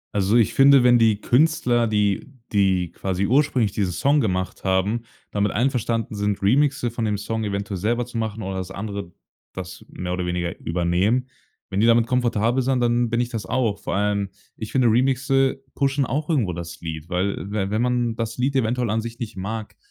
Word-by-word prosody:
Also, 100 +2 +2
ich 115 -4 +3
finde, 135 -1 +6
wenn 120 -1 +6
die 110 -3 +3
Künstler, 125 -4 +2
die 105 +3 0 0.2
die 95 -4 +2
quasi 95 0 -2
ursprünglich 130 -3 +2
diesen 95 -3 -1
Song 145 +6 +2
gemacht 95 -4 -2
haben, 95 +4 +1 0.3
damit 105 -1 0
einverstanden 115 -2 0
sind, 105 -1 -1
Remixe 135 +2 +2
von 115 -1 -4
dem 105 -2 0
Song 110 +2 -3
eventuell 100 -1 -3
selber 120 +4 0
zu 120 -1 -5
machen 110 -1 -3
oder 95 0 -4
das 95 -1 -4
andere 100 -2 -6 0.4
das 90 -2 -8
mehr 90 0 -4
oder 90 -1 -2
weniger 90 -1 -2
übernehmen. 90 +9 0 0.4
Wenn 95 - -1
die 115 - +4
damit 115 0 +5
komfortabel 120 0 +1
sind, 130 0 +1
dann 120 0 +2
bin 120 +1 +1
ich 120 - -2
das 110 -6 -5
auch. 115 -6 0
Vor - - -3
allem, 100 0 0 0.3
ich 110 - -7
finde 130 -3 +3
Remixe 135 +2 +2
pushen 140 -1 +1
auch 150 +7 -2
irgendwo 115 - +1
das 85 -1 -7
Lied, 80 0 -6
weil 95 +2 0 0.2
we 100 -2 -1
wenn 110 +2 +1
man 120 -2 0
das 115 0 -4
Lied 135 +2 0
eventuell 120 -2 +1
an 110 - 0
sich 115 +1 -7
nicht 115 -4 -6
mag, 105 +3 -5
110 Hz, 195 wpm, -23 LUFS, 100-125 Hz, 0.4 s, finde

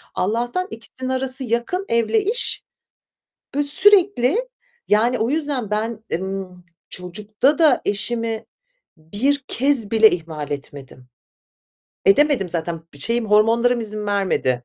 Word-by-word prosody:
Allah'tan 240 - -1
ikisinin 255 +3 -7
arası 260 +1 -1
yakın 240 - -2
evle 235 - +2
iş 440 +5 0 1.0
ve 290 - +2
sürekli, 395 - +3 0.4
yani, 235 +4 +2
o 225 +3 0
yüzden 285 -7 -2
ben, 220 +1 -3
ımm, 185 0 -5 0.3
çocukta 210 - -1
da 310 -6 +4
eşimi 225 +2 -2 0.5
bir 235 - -1
kez 260 -5 +1
bile 220 -1 +6
ihmal 160 -4 -5
etmedim. 140 -3 -8 1.0
Edemedim 295 - +4
zaten 165 -1 -3 0.2
şeyim 230 - +1
hormonlarım 230 +3 +3
izin 215 -1 -3
vermedi. 185 -11 0
230 Hz, 110 wpm, -21 LUFS, 195-265 Hz, 1.0 s, bile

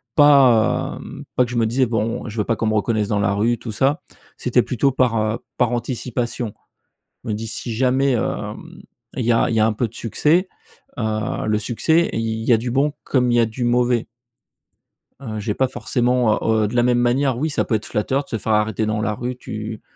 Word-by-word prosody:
pas 135 -7 +4
hem, - - -9
pas 125 - +4
que 120 - -9
je 120 - -2
me 115 -1 +2
disais, 130 +3 +2
bon, 115 +1 -2
je 110 +1 -7
veux - - +2
pas 115 - 0
qu'on 110 - -2
me 110 - +1
reconnaisse 105 -1 0
dans 105 - +1
la 100 -1 +1
rue 115 +3 +1
tout 115 - -6
ça, 140 - +1 0.4
c'était 125 -1 +2
plutôt 135 +3 +1
par, 125 -3 +1
heu, 110 +1 -1 0.2
par 125 -1 +2
anticipation, 120 -2 -3 0.7
me 110 - -2
dis 110 +2 -4
si 115 +2 -5
jamais, 130 +3 +2
hem, 120 - -4 0.4
il 125 - -1
y 120 - +3
a 115 - +3
il 115 - -1
y - - +3
a - - +5
un 110 - +1
peu 115 +2 -1
de 110 - -18
succès, 160 - +1 0.5
heu, 110 -1 -2
le 110 - +2
succès 160 +10 +1
il 110 0 -2
y 120 - +4
a - - +5
du 120 +3 -4
bon 145 +3 +1
comme 125 -2 +1
il - - +2
y - - +5
a - - +4
du 120 +3 -5
mauvais 120 -1 +2 1.1
heu, 110 -6 -5
j'ai 105 0 -2
pas 130 +3 +1
forcément 125 -3 +1
heu, 110 -1 +2
de 115 - -6
la 120 - +4
même 125 0 +3
manière, 125 +1 +1
oui, 155 +4 -1
ça - - 0
peut 115 - 0
être 110 - -3
flatteur 135 +7 -1
de - - -21
se 115 - -2
faire 110 +1 -1
arrêter 105 0 +1
dans 105 0 -1
la 110 -1 -1
rue, 125 +4 -4
tu 110 -2 -7
120 Hz, 230 wpm, -21 LUFS, 110-125 Hz, 1.1 s, a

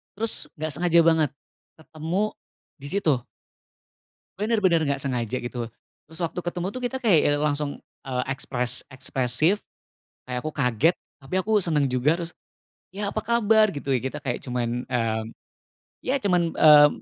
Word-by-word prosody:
terus 225 +2 0
nggak 155 0 -2
sengaja 170 +3 +3
banget 160 -3 +3 0.5
ketemu 160 +5 -2 0.5
di 140 -1 -9
situ. 190 -6 +2 1.2
Benar-benar 200 -7 +2
nggak 140 -1 0
sengaja, 125 -2 -1
gitu, 120 0 -4 0.4
terus 160 - -10
waktu 170 +1 -2
ketemu, 175 +1 -2
tuh, 255 +4 -7
kita 265 +2 -2
kayak, 205 -10 +5
ya, - - +4
langsung, 145 -1 -1 0.2
eee, 125 -1 -1
ekspres 125 -2 -2
ekspresif, 130 - +1 0.7
kayak 125 -1 -3
aku 155 - -3
kaget 135 +3 +2 0.3
tapi 135 +5 -7
aku 215 +3 +2
senang 150 -5 +2
juga. 130 +3 +1
Terus, 170 -1 -4 0.6
ya, 200 +2 -3
"Apa - - -2
kabar?" 220 -1 +4
Gitu, 140 - -7
ya. 130 - +3
Kita 135 +3 -4
kayak 125 -3 -2
cuman, 125 -1 -2
mmm, 115 -3 0 0.8
ya, 260 - +1
cuman, 175 -4 +2
mmm, 150 -1 +8
150 Hz, 150 wpm, -25 LUFS, 130-180 Hz, 1.2 s, mmm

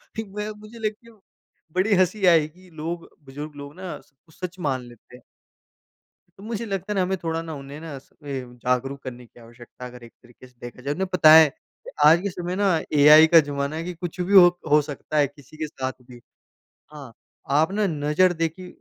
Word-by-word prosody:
ठीक, 220 -1 -5
मैं 210 +2 -5
मुझे 215 +2 -13
लेकिन 220 +1 -6 0.6
बड़ी 195 +4 +2
हँसी 185 +2 +1
आई 165 -4 +5
कि 180 +4 -20
लोग 165 +2 -6 0.2
बुज़ुर्ग 145 +3 -8
लोग 145 0 -10
ना, 185 -1 -7
सब 145 - -31
कुछ 160 - -22
सच 180 0 -7
मान 135 -6 -1
लेते 120 0 -16
हैं। 125 - -20 1.2
मुझे 225 +2 -5
लगता 195 -1 -4
है - - -5
ना, 190 - +2
हमें 190 +1 -1
थोड़ा 165 0 -2
ना, 165 -1 -7
उन्हें 140 +1 -9
ना, 160 -3 -7
इसपे 140 0 -8 0.2
जागरूक 125 +3 -2
करने 125 -1 -8
की 120 - -20
आवश्यकता, 120 +2 -13
अगर 125 -1 -11
एक 115 - -13
तरीके 120 +1 -17
से 125 - -27
देखा 120 +1 -10
जाए। 140 +3 -2
उन्हें 190 +4 -2
बताएँ 155 -3 +7 0.5
आज 160 +3 +7
के 200 - -2
समय 180 0 -5
ना, 195 -3 +2 0.2
एआई 150 +2 +8
का 165 +1 +7
ज़माना 145 0 -2
है 165 - -4
कि 180 +1 -5
कुछ 175 +1 -7
भी 185 +3 -2
हो 185 -3 +10 0.2
हो 150 0 +6
सकता 150 +1 -6
है, 145 -1 +4
किसी 145 +1 -18
के 155 0 -3
साथ 130 -3 -5
भी। 125 -1 -15 0.7
हाँ, 140 -5 -11 0.4
आप 155 +6 +2
ना 210 0 +1
नज़र 155 +2 +2
देखी 165 +2 -3
155 Hz, 205 wpm, -23 LUFS, 140-185 Hz, 1.2 s, हो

